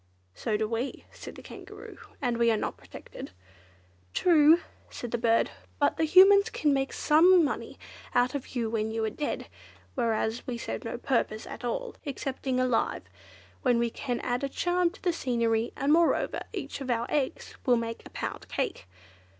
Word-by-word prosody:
"So 210 Hz, -, -1 dB
do 215 Hz, 0 st, -1 dB
we," 230 Hz, +4 st, -3 dB
said -, -, -10 dB
the -, -, -11 dB
Kangaroo, -, -, -11 dB, 0.2 s
"and 240 Hz, -2 st, 0 dB
we 235 Hz, 0 st, +4 dB
are 220 Hz, -, +3 dB
not -, -, -3 dB
protected." -, -, -10 dB, 0.9 s
"True," 325 Hz, -1 st, +6 dB, 0.3 s
said 240 Hz, -, -7 dB
the 240 Hz, -, -1 dB
bird, 230 Hz, -1 st, +2 dB, 0.3 s
"but -, -, +2 dB
the 320 Hz, -, +2 dB
Humans 395 Hz, +6 st, +7 dB
can 300 Hz, -9 st, +1 dB
make 270 Hz, 0 st, 0 dB
some 340 Hz, +3 st, +5 dB
money -, -, -4 dB, 0.4 s
out 245 Hz, +1 st, +3 dB
of 275 Hz, -2 st, -6 dB
you 235 Hz, -2 st, 0 dB
when 220 Hz, -1 st, -1 dB
you 220 Hz, 0 st, -1 dB
are 220 Hz, -, -2 dB
dead, 295 Hz, +6 st, -3 dB, 0.5 s
whereas 225 Hz, -1 st, -1 dB
we 245 Hz, -2 st, -3 dB
serve -, -, -5 dB
no 230 Hz, -, -4 dB
purpose 235 Hz, -4 st, -1 dB
at -, -, -9 dB
all, 485 Hz, -, -3 dB
excepting 265 Hz, -2 st, -3 dB
alive, 255 Hz, -2 st, +1 dB, 0.6 s
when 250 Hz, -3 st, +3 dB
we 235 Hz, -1 st, 0 dB
add 245 Hz, +1 st, -1 dB
a 275 Hz, -, 0 dB
charm 355 Hz, +3 st, +1 dB
to 355 Hz, -, -17 dB
the 355 Hz, -2 st, +2 dB
scenery; 235 Hz, -5 st, 0 dB
and, 285 Hz, +2 st, +2 dB
moreover, 335 Hz, +1 st, +2 dB
each -, -, -6 dB
of 265 Hz, -, -5 dB
our 235 Hz, -1 st, +1 dB
eggs 285 Hz, -3 st, -2 dB
will 245 Hz, -1 st, +5 dB
make 230 Hz, 0 st, -4 dB
a -, -, -12 dB
pound -, -, -5 dB
cake. 90 Hz, -, -3 dB
250 Hz, 175 wpm, -28 LUFS, 230-300 Hz, 0.9 s, Humans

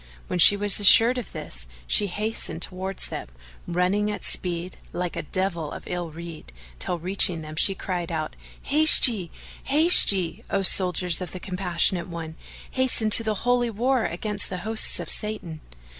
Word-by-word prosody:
When 180 Hz, -, -5 dB
she 200 Hz, +4 st, +9 dB
was 205 Hz, 0 st, +2 dB
assured 230 Hz, +5 st, +5 dB
of 240 Hz, -, -10 dB
this, -, -, -8 dB, 0.2 s
she 205 Hz, -, +1 dB
hastened 205 Hz, -3 st, -3 dB
towards 190 Hz, +1 st, -6 dB
them, -, -, -7 dB, 0.4 s
running 185 Hz, +4 st, -1 dB
at 210 Hz, -, -6 dB
speed, 180 Hz, 0 st, -6 dB, 0.2 s
like 180 Hz, -1 st, -5 dB
a -, -, -4 dB
devil 170 Hz, -2 st, -4 dB
of -, -, -9 dB
ill 175 Hz, -2 st, -6 dB
rede, 165 Hz, -, -11 dB, 0.3 s
till 175 Hz, -, -3 dB
reaching 180 Hz, -1 st, -2 dB
them 155 Hz, 0 st, -10 dB
she 195 Hz, +5 st, +2 dB
cried 180 Hz, -3 st, -6 dB
out, 155 Hz, -1 st, -5 dB, 0.3 s
"Haste 310 Hz, 0 st, +6 dB
ye! 200 Hz, -8 st, -4 dB, 0.4 s
haste 310 Hz, +2 st, +6 dB
ye! 185 Hz, -4 st, -4 dB
O 195 Hz, -, -2 dB
soldiers 180 Hz, -1 st, +3 dB
of 180 Hz, -, -7 dB
the 185 Hz, -, -8 dB
Compassionate 180 Hz, -2 st, 0 dB
One, 165 Hz, -2 st, -8 dB, 0.4 s
hasten 255 Hz, -4 st, 0 dB
to 225 Hz, -, +9 dB
the 215 Hz, -1 st, -3 dB
Holy 245 Hz, -1 st, +1 dB
War 240 Hz, +3 st, -1 dB
against 205 Hz, +4 st, -5 dB
the 185 Hz, +1 st, -8 dB
hosts 220 Hz, 0 st, +2 dB
of -, -, -7 dB
Satan!" 195 Hz, -7 st, -4 dB
185 Hz, 170 wpm, -23 LUFS, 170-215 Hz, 0.4 s, she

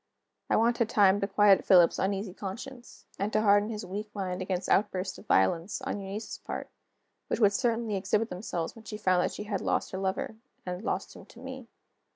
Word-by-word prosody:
I -, -, +3 dB
wanted 235 Hz, 0 st, +2 dB
time 200 Hz, -1 st, +5 dB
to 200 Hz, -, +1 dB
quiet 200 Hz, -1 st, +5 dB
Philip's 175 Hz, -3 st, +5 dB
uneasy 195 Hz, 0 st, -1 dB
conscience, 240 Hz, +7 st, -8 dB
and 200 Hz, +2 st, -1 dB
to 215 Hz, -, +3 dB
harden 205 Hz, 0 st, +4 dB
his 215 Hz, -2 st, -5 dB
weak 205 Hz, +3 st, -5 dB
mind 185 Hz, -2 st, -3 dB
against 185 Hz, 0 st, -2 dB
outbursts 190 Hz, -2 st, +1 dB
of -, -, -16 dB
violence, 165 Hz, -, +2 dB
on 265 Hz, -6 st, -3 dB
Eunice's 195 Hz, +3 st, -6 dB
part, -, -, -6 dB, 0.6 s
which -, -, -1 dB
would 205 Hz, -3 st, +5 dB
certainly 230 Hz, -2 st, 0 dB
exhibit 210 Hz, +4 st, 0 dB
themselves 180 Hz, -2 st, -4 dB
when 225 Hz, -1 st, -14 dB
she 210 Hz, -, -6 dB
found 185 Hz, -4 st, +2 dB
that -, -, 0 dB
she -, -, -5 dB
had 205 Hz, -2 st, -3 dB
lost -, -, 0 dB
her 190 Hz, -, -4 dB
lover, 195 Hz, +3 st, -2 dB, 0.3 s
and 180 Hz, +2 st, -5 dB
lost -, -, -3 dB
him -, -, -13 dB
to -, -, -15 dB
me. 260 Hz, -2 st, -8 dB
200 Hz, 195 wpm, -29 LUFS, 190-220 Hz, 0.6 s, time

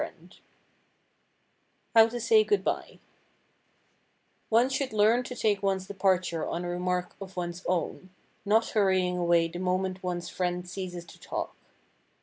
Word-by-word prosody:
[Sidenote: -, -, -9 dB, 1.6 s
HOW 225 Hz, 0 st, +8 dB
TO 240 Hz, +1 st, -5 dB
SAY 435 Hz, -, +5 dB
GOOD 415 Hz, -1 st, +1 dB
BY] -, -, -3 dB, 1.5 s
One 230 Hz, +3 st, +4 dB
should 265 Hz, -2 st, -2 dB
learn 215 Hz, +3 st, +4 dB
to 250 Hz, 0 st, -7 dB
take 210 Hz, -4 st, +1 dB
one's 195 Hz, -1 st, 0 dB
departure 185 Hz, -4 st, 0 dB
on 175 Hz, +1 st, -3 dB
a -, -, -3 dB
remark 180 Hz, 0 st, -2 dB
of 190 Hz, -1 st, -9 dB
one's 175 Hz, +1 st, -4 dB
own, 185 Hz, +1 st, -2 dB, 0.3 s
not 220 Hz, +2 st, +3 dB
hurrying 185 Hz, -3 st, +2 dB
away 170 Hz, -1 st, +3 dB
the 175 Hz, +1 st, -7 dB
moment 185 Hz, 0 st, -1 dB
one's 175 Hz, -1 st, -3 dB
friend 180 Hz, 0 st, -2 dB
ceases 180 Hz, -2 st, -6 dB
to -, -, -15 dB
talk. -, -, -5 dB
185 Hz, 140 wpm, -28 LUFS, 180-215 Hz, 1.6 s, HOW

